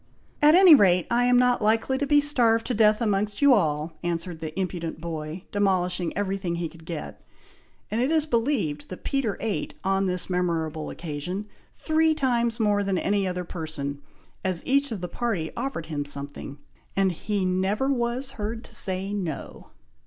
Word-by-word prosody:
"At 300 +2 +7
any 370 -2 +9
rate, 180 - +5
I 240 +1 +3
am 245 0 +4
not 250 -1 +3
likely 225 +5 +2
to 285 - -1
be 290 +1 +5
starved 235 -6 +4
to 255 - -1
death 215 0 +4
amongst 205 -1 0
you 285 -2 +6
all!" 155 -6 +1
answered 170 -1 -3
the 160 +3 -5
impudent 175 -3 -3
boy, 160 +1 -5
demolishing 180 -3 +1
every 195 -1 -1
thing 180 -3 -3
he 170 -1 -3
could 165 -1 -16
get; 165 -3 -6 0.7
and 220 +3 0
it 255 - +1
is 315 -1 +3
believed 225 - -1
that 185 - -8
Peter 265 -7 -1
ate, 220 -3 -3
on 195 0 +1
this 180 -1 -1
memorable 165 -4 -1
occasion, 175 +5 -4 0.3
three 315 0 +2
times 240 -5 0
more 205 -2 +2
than 195 -2 0
any 200 +1 +1
other 180 0 -3
person, 155 -5 -5 0.4
as 185 -3 -2
each 280 0 +2
of 210 -5 -4
the 180 - -3
party 195 -8 -2
offered 240 -9 -3
him 150 -2 -3
something, 140 0 -6 0.4
and 195 -1 +2
he 200 +3 -2
never 190 +7 0
was 245 +2 -2
heard 225 +2 -4
to - - -13
say, 195 -1 -2
"No!" 175 -8 -5
195 Hz, 175 wpm, -25 LUFS, 170-235 Hz, 0.7 s, any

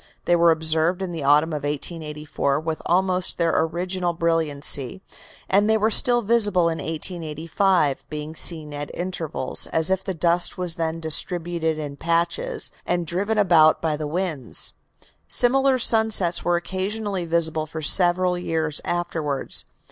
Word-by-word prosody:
They 175 - +3
were 170 0 +4
observed 160 +3 +1
in 185 - -5
the 165 -4 -5
autumn 150 +3 +3
of 150 -2 -4
1884 150 -1 -3
with 160 0 -4
almost 185 +1 0
their 170 -1 +1
original 175 +2 -1
brilliancy, 165 0 +1 0.4
and 205 +2 +2
they 220 - +3
were 220 +1 0
still 240 +1 +3
visible 205 -6 +4
in 160 - -4
1885, 160 0 -2
being 150 +1 -7
seen 155 -3 -1
at 145 0 -6
intervals, 170 -6 -3
as 160 +3 +1
if 190 0 0
the 190 -2 -4
dust 170 +1 +2
was 180 -2 0
then 165 0 -3
distributed 160 0 -1
in 145 -2 -7
patches, 170 - 0
and 175 -1 -2
driven 200 +7 -2
about 170 -6 +4
by 160 -2 -1
the 150 0 -5
winds. 155 - -3 0.3
In - - -23
fact, - - -26
similar 265 - +2
sunsets 220 -7 +3
were 175 - +1
occasionally 190 +1 -3
visible 160 -2 0
for 160 0 -7
several 180 +2 +5
years 160 -3 -3
afterwards. 160 -5 -3
170 Hz, 150 wpm, -22 LUFS, 155-185 Hz, 0.4 s, several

